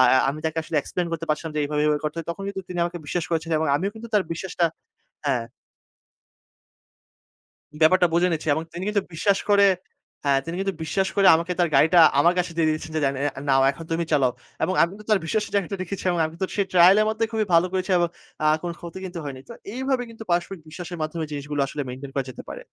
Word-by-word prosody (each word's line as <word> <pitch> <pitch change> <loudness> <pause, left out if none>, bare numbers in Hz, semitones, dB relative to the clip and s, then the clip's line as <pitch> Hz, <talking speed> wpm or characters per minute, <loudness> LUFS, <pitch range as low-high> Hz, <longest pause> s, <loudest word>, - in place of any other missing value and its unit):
আ - - +8 0.3
আমি 145 - -2
তাকে 160 0 -2
আসলে 155 - -4
এক্সপ্লেইন 175 +4 -3
করতে 165 0 -3
পারছিলাম 155 +1 -2
যে, - - +1
এভাবে, 150 0 -1
এভাবে 150 -1 +2
করতে 150 +1 -2
হয় 165 - -5
তখন 195 +4 -6
কিন্তু 195 -1 -5
তিনি 180 -1 -5
আমাকে 175 0 -4
বিশ্বাস 175 +2 -1
করেছেন 165 0 -1
এবং 160 - 0
আমিও 195 +6 -1
কিন্তু 225 +1 -9
তার 205 - +5
বিশ্বাসটা 175 0 -1 0.6
হ্যাঁ। 125 -4 +1 2.4
ব্যাপারটা 175 +3 +5
বুঝে 175 +2 +3
নিচ্ছি 160 -1 -3
এবং 160 - -2
তিনি 180 +2 -5
কিন্তু 210 -2 +1
বিশ্বাস 195 +4 +2
করে 200 0 +6 0.6
হ্যাঁ, 135 -1 +3
তিনি 165 +3 -5
কিন্তু 195 -1 -1
বিশ্বাস 190 +4 0
করে 200 -1 +4
আমাকে 170 +2 0
তার 175 - +3
গাড়িটা 160 +5 +6 0.2
আমার 170 +4 +4
কাছে 180 -1 -1
দিয়ে 160 -2 +3
দিয়েছেন, 155 +1 -3
যে, 155 - 0 0.5
"নাও, 135 -1 +5
এখন 165 +4 -9
তুমি 170 +1 0
চালাও।" 130 -4 +3 0.3
এবং 185 +4 +1
আমি 170 - +2
তো - - -12
তার 210 - +5
বিশ্বাসের 215 +6 -1
জায়গাটা 200 0 0
রেখেছি 185 +2 -6
এবং 175 - -1
আমি 160 - -10
তো - - +1
সেই 200 - +1
ট্রায়াল 180 +2 +7
এর 215 - +3
মধ্যে 220 +1 0
খুবই 220 -2 0
ভালো 165 +2 +5
করেছি 190 +1 -1
এবং 175 0 +2 0.4
আ - - +4 0.2
কোন 175 - -3
ক্ষতি 170 +1 -8
কিন্তু 180 -2 -6
হয়নি। 135 -2 -6
তো - - -8 0.2
এইভাবে 265 -1 0
কিন্তু 225 0 -10
পারস্পরিক 175 +1 0
বিশ্বাসের 175 +2 -7
মাধ্যমে 155 +1 -3
জিনিসগুলো 145 0 -3
আসলে 145 +2 -4
মেইনটেইন 135 +2 -7
করা 135 -2 0
যেতে - - -9
পারে। - - -7
170 Hz, 220 wpm, -24 LUFS, 155-190 Hz, 2.4 s, আ